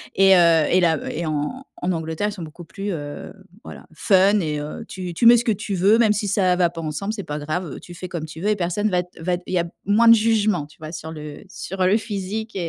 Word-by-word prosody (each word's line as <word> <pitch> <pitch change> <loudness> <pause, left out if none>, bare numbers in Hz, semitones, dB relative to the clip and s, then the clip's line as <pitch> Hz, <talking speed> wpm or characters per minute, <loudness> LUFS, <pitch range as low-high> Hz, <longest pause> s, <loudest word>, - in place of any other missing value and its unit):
et, 195 0 +6
heu 165 -3 +5
et 185 - +3
là 160 -3 +2
et 170 +2 -4
en 155 - -3 0.2
en 180 - 0
Angleterre 160 +5 -2
ils 210 - -4
sont 180 -5 -7
beaucoup 160 +2 -10
plus, 200 +4 -5
heu, 145 -4 -6 0.3
voilà, - - -11
fun 195 +3 +3
et, 150 -3 -2
heu, 150 +1 -6
tu 180 -2 -6
tu 235 - 0
mets 235 +1 +9
ce 240 - -1
que 225 - +2
tu 200 +1 -5
veux 195 +5 +4
même 225 -3 +4
si 205 0 -2
ça 185 -2 +2
va 175 -2 +3
pas 165 -1 -7
ensemble, 160 +7 -3
c'est 200 -4 -5
pas 150 0 -5
grave, 155 +1 -4
tu 175 - -11
fais 185 +1 -7
comme 165 -3 -4
tu 160 +1 -10
veux 205 - 0
et 210 - +1
personne 185 +4 0
va 180 -1 +1 0.2
va 175 +1 0
il - - -5
y 180 - +3
a 170 - 0 0.2
moins 225 +3 +4
de - - +10
jugement, 215 -7 +1
tu 150 - -21
vois, 155 0 -8
sur 160 -1 -7
le 150 +4 -9
sur 190 0 -6
le 195 +3 +4
physique 215 0 -5
180 Hz, 260 wpm, -22 LUFS, 160-205 Hz, 0.3 s, de